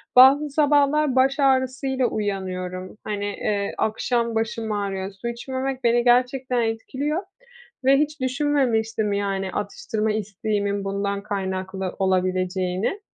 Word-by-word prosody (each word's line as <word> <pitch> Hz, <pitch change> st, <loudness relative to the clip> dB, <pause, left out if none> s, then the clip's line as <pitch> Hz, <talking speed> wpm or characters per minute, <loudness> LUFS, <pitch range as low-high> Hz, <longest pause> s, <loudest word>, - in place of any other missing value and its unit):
bazı 275 Hz, +4 st, +7 dB
sabahlar 290 Hz, -1 st, +3 dB
baş 270 Hz, +2 st, +3 dB
ağrısıyla 265 Hz, -1 st, +2 dB
uyanıyorum. 185 Hz, -2 st, -4 dB
Hani, 205 Hz, -1 st, -3 dB
eee, 205 Hz, 0 st, -2 dB
akşam 235 Hz, +1 st, 0 dB
başım 225 Hz, 0 st, -2 dB
ağrıyor. 195 Hz, -2 st, -2 dB
Su 195 Hz, +4 st, -7 dB
içmemek 260 Hz, +2 st, -3 dB
beni 240 Hz, 0 st, +3 dB
gerçekten 250 Hz, +1 st, +2 dB
etkiliyor 265 Hz, -, -2 dB, 0.6 s
ve 270 Hz, +1 st, +6 dB
hiç 300 Hz, 0 st, -1 dB
düşünmemiştim, 250 Hz, -6 st, +1 dB
yani, 195 Hz, -1 st, -1 dB
atıştırma 215 Hz, +1 st, -2 dB
isteğimin 205 Hz, -1 st, -2 dB
bundan 200 Hz, 0 st, -2 dB
kaynaklı 190 Hz, -2 st, -3 dB
olabileceğini. 185 Hz, -, 0 dB
220 Hz, 110 wpm, -23 LUFS, 200-260 Hz, 0.6 s, bazı